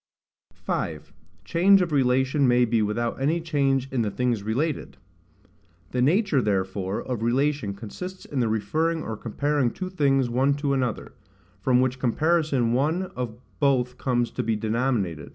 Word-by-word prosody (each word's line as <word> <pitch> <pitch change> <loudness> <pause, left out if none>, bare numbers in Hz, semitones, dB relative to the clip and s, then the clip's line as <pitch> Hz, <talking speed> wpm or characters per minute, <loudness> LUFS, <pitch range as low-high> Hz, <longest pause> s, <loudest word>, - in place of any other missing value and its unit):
5. - - -4 0.3
Change 190 - +5
of 180 -3 0
Relation 130 0 +2
may 125 0 +4
be 115 -1 +1
without 115 +4 -2
any 155 +5 +1
Change 140 -5 0
in 130 -3 0
the 110 - 0
things 120 0 -1
related. 130 +9 -2 0.9
The 125 - 0
nature 160 - +3
therefore 95 -2 -1
of 125 -4 -4
relation 130 -2 0
consists 180 - -8
in 140 - -3
the 120 - +2
referring 155 +10 0
or 110 - -4
comparing 140 +4 0
two 185 +9 -6
things 135 -6 +2
one 130 +4 +2
to 145 -1 -1
another; 125 -4 -2 0.5
from 125 -1 +3
which 130 0 0
comparison 140 -2 +1
one 160 +8 0
or 125 -3 -4 0.2
both 125 -3 +1
comes 120 -2 0
to - - -2
be 110 0 0
denominated. 105 - -1
130 Hz, 155 wpm, -25 LUFS, 115-145 Hz, 0.9 s, Change